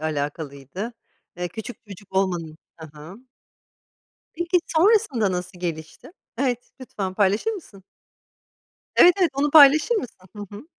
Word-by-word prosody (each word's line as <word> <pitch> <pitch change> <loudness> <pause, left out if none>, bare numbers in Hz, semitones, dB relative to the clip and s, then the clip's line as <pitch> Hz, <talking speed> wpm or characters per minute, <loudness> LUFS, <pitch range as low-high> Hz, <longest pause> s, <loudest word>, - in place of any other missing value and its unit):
alakalıydı. 150 - -5 0.4
Eee, 180 0 -3
küçük 220 +5 -8
çocuk 195 0 -13
olmanın 175 -5 -1 0.2
Hı 160 - -9
hı. 160 +6 -11 1.2
Peki, 345 +2 +1
sonrasında 315 - +2
nasıl 180 0 -5
gelişti? 160 - -6 0.3
Evet, 250 -2 -2
lütfen 195 -7 -5
paylaşır 205 - +1
mısın? 265 - -10 1.1
Evet, 355 - +7
evet, 350 -4 +3
onu 285 +2 0
paylaşır 300 - +7
mısın? 385 - -4 0.2
Hı 205 0 -7
hı. 220 - -12
200 Hz, 120 wpm, -23 LUFS, 175-285 Hz, 1.2 s, Evet